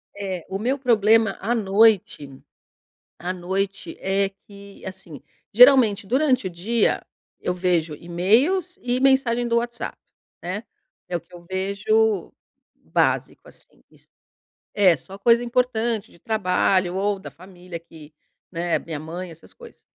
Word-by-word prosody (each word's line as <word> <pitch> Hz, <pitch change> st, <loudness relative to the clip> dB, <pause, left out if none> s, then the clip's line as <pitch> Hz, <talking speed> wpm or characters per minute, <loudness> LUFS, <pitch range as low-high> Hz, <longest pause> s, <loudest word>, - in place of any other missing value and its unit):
É. 190 Hz, -4 st, -5 dB
O 195 Hz, -, -3 dB
meu 255 Hz, +6 st, 0 dB
problema 225 Hz, -4 st, +3 dB
à 225 Hz, +5 st, 0 dB
noite 200 Hz, -7 st, +2 dB, 0.9 s
à 180 Hz, +1 st, -3 dB
noite 190 Hz, +2 st, -3 dB
é 195 Hz, 0 st, 0 dB, 0.2 s
que 200 Hz, -1 st, -14 dB
assim, 190 Hz, -5 st, -9 dB, 0.3 s
geralmente 240 Hz, -4 st, +6 dB
durante 255 Hz, -2 st, +1 dB
o -, -, -4 dB
dia, 205 Hz, +6 st, 0 dB, 0.4 s
eu 180 Hz, -, -2 dB
vejo 175 Hz, -4 st, 0 dB
e-mails 240 Hz, -, +1 dB
e 250 Hz, +1 st, -1 dB
mensagem 260 Hz, -3 st, +2 dB
do 235 Hz, 0 st, +2 dB
WhatsApp, 240 Hz, 0 st, -4 dB, 0.4 s
né. 185 Hz, +5 st, -4 dB, 0.4 s
É 180 Hz, -, -4 dB
o 170 Hz, -, -2 dB
que 170 Hz, -, -27 dB
eu 175 Hz, -1 st, -13 dB
vejo 200 Hz, +1 st, 0 dB, 0.4 s
básico -, -, -1 dB
assim -, -, -14 dB
iss -, -, -25 dB, 0.7 s
É 190 Hz, -5 st, +5 dB
só 190 Hz, +8 st, -12 dB
coisa 235 Hz, +3 st, +4 dB
importante 235 Hz, -3 st, -1 dB
de -, -, -20 dB
trabalho 185 Hz, -3 st, +1 dB
ou 200 Hz, +1 st, 0 dB
da -, -, -10 dB
família 180 Hz, -1 st, -11 dB
que, 155 Hz, -2 st, -15 dB, 0.4 s
né, 170 Hz, 0 st, 0 dB
a -, -, 0 dB
minha 160 Hz, -3 st, -7 dB
mãe 170 Hz, +3 st, -7 dB
essas 165 Hz, 0 st, -15 dB
coisas. 475 Hz, -1 st, -15 dB
200 Hz, 140 wpm, -23 LUFS, 180-235 Hz, 0.9 s, geralmente